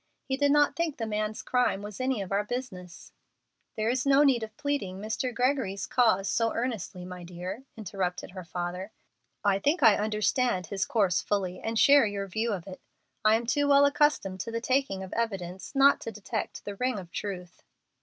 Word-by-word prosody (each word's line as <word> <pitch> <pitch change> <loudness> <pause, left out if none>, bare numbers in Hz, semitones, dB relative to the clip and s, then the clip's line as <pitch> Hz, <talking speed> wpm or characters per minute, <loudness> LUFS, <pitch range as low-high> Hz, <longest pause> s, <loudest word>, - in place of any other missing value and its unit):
He 265 - -1
did 285 +1 +2
not 295 0 +4
think 335 -3 -1
the 225 - -2
man's 215 0 -2
crime 250 -5 +1
was 210 +2 -7
any 255 -5 0
of 190 - -10
our 200 +1 +1
business 210 -7 -7 0.3
" - - -50
"There 215 0 0
is 245 +2 +1
no 275 +1 +5
need 265 -5 +4
of 215 -1 -7
pleading 285 -11 -2
Mr. 220 +5 -2
Gregory's 245 -6 0
cause 220 -6 +2
so 230 +3 +1
earnestly, 220 -7 -3
my 180 -1 -8
dear," 180 +8 -7
interrupted 190 -4 -3
her 185 0 -8
father. 180 +3 -5 0.5
"I 200 -1 +3
think 290 - +1
I 220 -3 +7
understand 210 -1 +1
his 195 +4 -2
course 195 -6 +2
fully, 185 -3 -2
and 225 0 -3
share 280 -1 +6
your 200 -1 -3
view 220 +4 -2
of 185 -4 -4
it. 190 -2 -10 0.4
I 215 +1 +5
am 230 +1 -1
too 285 +5 +1
well 280 0 +6
accustomed 285 -10 +2
to 230 - -4
the 230 0 -2
taking 255 -6 0
of 190 - -8
evidence 195 -2 -3
not 275 +1 +5
to 225 - -5
detect 215 +1 -5
the 205 - -4
ring 250 +2 -1
of 180 -3 -8
truth." 180 -3 -6
215 Hz, 195 wpm, -28 LUFS, 190-255 Hz, 0.5 s, I